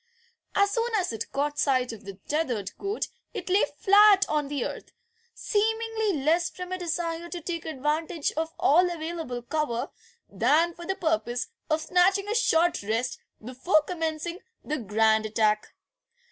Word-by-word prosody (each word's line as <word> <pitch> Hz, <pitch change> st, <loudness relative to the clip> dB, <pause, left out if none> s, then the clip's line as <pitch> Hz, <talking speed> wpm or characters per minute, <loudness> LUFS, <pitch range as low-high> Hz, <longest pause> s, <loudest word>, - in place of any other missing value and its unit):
As 400 Hz, 0 st, +3 dB
soon 460 Hz, +2 st, 0 dB
as 365 Hz, -, -1 dB
it 225 Hz, -, -5 dB
caught 290 Hz, +1 st, -1 dB
sight 255 Hz, -3 st, +2 dB
of 215 Hz, -, -12 dB
the 195 Hz, -1 st, -7 dB
tethered 245 Hz, -11 st, -1 dB
goat 400 Hz, +2 st, -2 dB, 0.3 s
it -, -, -5 dB
lay 395 Hz, +3 st, +4 dB
flat 405 Hz, 0 st, +6 dB
on 300 Hz, -2 st, 0 dB
the 280 Hz, -3 st, -2 dB
earth, -, -, -7 dB, 0.4 s
seemingly 440 Hz, -5 st, 0 dB
less 335 Hz, +3 st, +2 dB
from 360 Hz, 0 st, -8 dB
a 370 Hz, -, -1 dB
desire 340 Hz, -1 st, -3 dB
to 350 Hz, -, -5 dB
take 335 Hz, 0 st, -5 dB
advantage 310 Hz, +1 st, -1 dB
of 320 Hz, +1 st, -3 dB
all 355 Hz, +5 st, +4 dB
available 320 Hz, -7 st, -5 dB
cover 245 Hz, -3 st, -2 dB, 0.4 s
than 335 Hz, +3 st, +2 dB
for 345 Hz, 0 st, -10 dB
the 385 Hz, -, 0 dB
purpose 315 Hz, -9 st, -1 dB, 0.2 s
of 310 Hz, 0 st, +1 dB
snatching 370 Hz, +4 st, +2 dB
a 420 Hz, -, -1 dB
short 350 Hz, -7 st, +2 dB
rest 225 Hz, +5 st, -2 dB, 0.3 s
before 275 Hz, +6 st, +2 dB
commencing 325 Hz, +1 st, -3 dB, 0.2 s
the 305 Hz, 0 st, -3 dB
grand 220 Hz, 0 st, +2 dB
attack. 215 Hz, -1 st, 0 dB
320 Hz, 155 wpm, -27 LUFS, 260-360 Hz, 0.4 s, flat